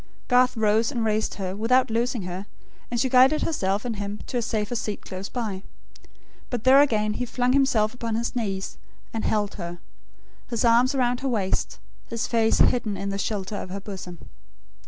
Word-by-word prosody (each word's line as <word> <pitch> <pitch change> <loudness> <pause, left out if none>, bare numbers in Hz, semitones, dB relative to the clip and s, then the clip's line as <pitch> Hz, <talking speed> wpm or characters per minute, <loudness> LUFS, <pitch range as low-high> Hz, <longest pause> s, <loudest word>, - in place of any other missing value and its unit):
Garth 250 -1 +4
rose, 220 +3 +2
and 235 -5 -1
raised 215 0 0
her, 190 -1 -4
without 235 +3 +2
loosing 235 -1 0
her; 185 +3 -6 0.4
and 240 - -1
she 260 - +2
guided 260 +4 +5
herself 205 -8 -1
and 230 -3 -3
him 205 0 -4
to 250 - -3
a - - +1
safer 220 0 -2
seat 215 -3 -3
close 190 +1 -6
by. 215 -6 -3 0.9
But 240 -3 -3
there 265 +2 +7
again 215 -6 +2
he 250 - -2
flung 250 +1 +1
himself 250 -6 +3
upon 230 -2 -3
his 235 +2 -2
knees, 195 -5 -3 0.3
and 225 - -2
held 210 -1 0
her; 170 0 -5 0.7
his 235 -1 0
arms 240 +4 +4
around 245 -2 +1
her 270 - -2
waist; 205 -6 -1 0.3
his 230 -1 -2
face 225 -1 +2
hidden 215 -5 +2
in 200 - -3
the 195 0 -3
shelter 205 -1 -2
of - - -6
her 195 +2 -5
bosom. 190 -3 -8
225 Hz, 185 wpm, -25 LUFS, 205-245 Hz, 0.9 s, there